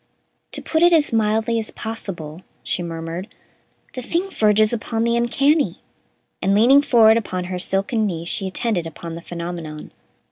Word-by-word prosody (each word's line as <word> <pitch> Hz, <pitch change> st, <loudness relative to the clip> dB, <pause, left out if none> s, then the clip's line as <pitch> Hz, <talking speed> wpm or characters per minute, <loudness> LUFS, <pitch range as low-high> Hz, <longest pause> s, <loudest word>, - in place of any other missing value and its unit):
"To -, -, -4 dB
put 320 Hz, -, 0 dB
it 345 Hz, 0 st, +6 dB
as 300 Hz, -6 st, +3 dB
mildly 225 Hz, +1 st, +1 dB
as 220 Hz, -, -3 dB
possible," 180 Hz, -8 st, -6 dB, 0.2 s
she -, -, -1 dB
murmured, 170 Hz, +4 st, -6 dB, 0.6 s
"the 255 Hz, -, -5 dB
thing 345 Hz, +9 st, -2 dB
verges 215 Hz, -, +3 dB
upon 225 Hz, 0 st, -2 dB
the 235 Hz, 0 st, +1 dB
uncanny"; 275 Hz, +6 st, +2 dB, 0.6 s
and, 195 Hz, +2 st, +2 dB
leaning 255 Hz, +7 st, +6 dB
forward 225 Hz, -5 st, +5 dB
upon 185 Hz, -5 st, -3 dB
her 180 Hz, 0 st, -4 dB
silken 195 Hz, +4 st, +1 dB
knees, 170 Hz, -3 st, -4 dB
she 195 Hz, +2 st, -2 dB
attended 190 Hz, -3 st, -1 dB
upon 165 Hz, +1 st, -8 dB
the 165 Hz, -, -7 dB
phenomenon. 170 Hz, -3 st, -7 dB
215 Hz, 155 wpm, -21 LUFS, 175-235 Hz, 0.6 s, it